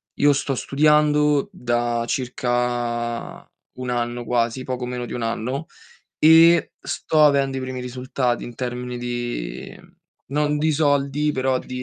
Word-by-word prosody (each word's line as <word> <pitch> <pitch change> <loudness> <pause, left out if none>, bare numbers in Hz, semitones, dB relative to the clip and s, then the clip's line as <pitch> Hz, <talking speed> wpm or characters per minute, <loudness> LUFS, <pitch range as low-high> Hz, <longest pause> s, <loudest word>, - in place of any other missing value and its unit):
io 145 0 +4
sto 140 -1 -1
studiando 150 +2 +3
da 120 - -1
circa 120 -2 -2 0.3
1 125 0 -6
anno, 120 0 -2
quasi, 120 +2 0
poco 125 -1 -4
meno 125 0 -4
di - - -7
1 120 - -4
anno, 125 +7 -3 0.5
e 165 +2 +6
sto 155 -1 0
avendo 140 -2 +3
i - - -2
primi 130 0 -5
risultati 125 0 -2
in 120 - -9
termini 125 0 -4
di 120 - -5 0.5
non 150 +2 0
di 155 +1 +2
soldi, 145 0 +1
però 130 -1 0
di 125 0 -6
125 Hz, 135 wpm, -22 LUFS, 120-145 Hz, 0.5 s, e